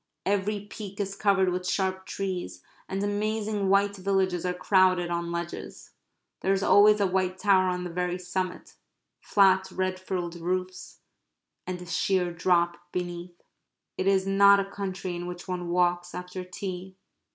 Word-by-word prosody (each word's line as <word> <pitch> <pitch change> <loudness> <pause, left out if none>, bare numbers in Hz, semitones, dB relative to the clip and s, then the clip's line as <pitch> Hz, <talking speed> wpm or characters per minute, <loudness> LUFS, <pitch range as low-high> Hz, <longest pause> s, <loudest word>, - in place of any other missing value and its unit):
Every 205 +1 0
peak 205 -1 -9
is 200 -1 -2
covered 195 -2 +3
with 180 0 -2
sharp 190 -1 -1
trees, 180 - -4 0.3
and 195 +1 -2
amazing 210 0 -1
white 200 +1 +3
villages 185 -2 0
are - - +1
crowded 185 -2 +3
on 170 0 -2
ledges. 170 0 -6 0.5
There 195 - +1
is 195 0 0
always 210 +1 +6
a 200 - +3
white 185 0 0
tower 185 -2 +3
on 180 0 -2
the 175 - -5
very 180 +1 -1
summit, 180 0 -4 0.4
flat 190 -2 +3
red 185 0 -2
frilled 175 -2 -4
roofs, 185 +2 -4 0.7
and 180 -1 -3
a 180 - -9
sheer 180 0 0
drop 175 0 +2
beneath. 175 -1 -5 0.5
It 185 - -2
is 190 -1 +3
not 200 +1 +6
a 195 - 0
country 190 -2 -4
in 175 0 -5
which 175 0 -7
one 180 -1 -3
walks 175 0 +1
after 180 +1 -6
tea. 185 0 -7
185 Hz, 155 wpm, -27 LUFS, 180-195 Hz, 0.7 s, always